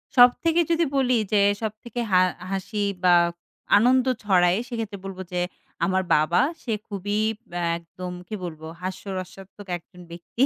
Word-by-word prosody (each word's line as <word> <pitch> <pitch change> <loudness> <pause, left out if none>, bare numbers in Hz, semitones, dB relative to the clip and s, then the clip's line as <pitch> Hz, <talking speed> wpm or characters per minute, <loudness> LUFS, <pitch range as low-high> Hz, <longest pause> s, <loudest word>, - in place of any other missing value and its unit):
সব 245 0 +9
থেকে 335 +1 +3
যদি 335 0 +3
বলি 255 -3 +3 0.2
যে 205 - +5 0.2
সবথেকে 220 +2 -5
হা 185 -1 +6 0.3
হাসি 205 +2 -2 0.2
বা 180 - +6 0.6
আনন্দ 250 +4 +4 0.2
ছড়ায় 180 -1 +4
সেক্ষেত্রে 225 -4 -4
বলব 190 -1 -7
যে 180 - 0 0.4
আমার 190 +1 +1
বাবা 155 +6 +3 0.2
সে 230 - -1
খুবই 205 0 -2 0.4
আ - - -1 0.2
একদম 180 +2 -8 0.2
কি 215 - -4
বলবো 160 -2 -6
হাস্যরসাত্মক 190 +1 -7
একজন 180 +1 -17
ব্যক্তি। 175 +8 -2
195 Hz, 145 wpm, -24 LUFS, 180-230 Hz, 0.6 s, সব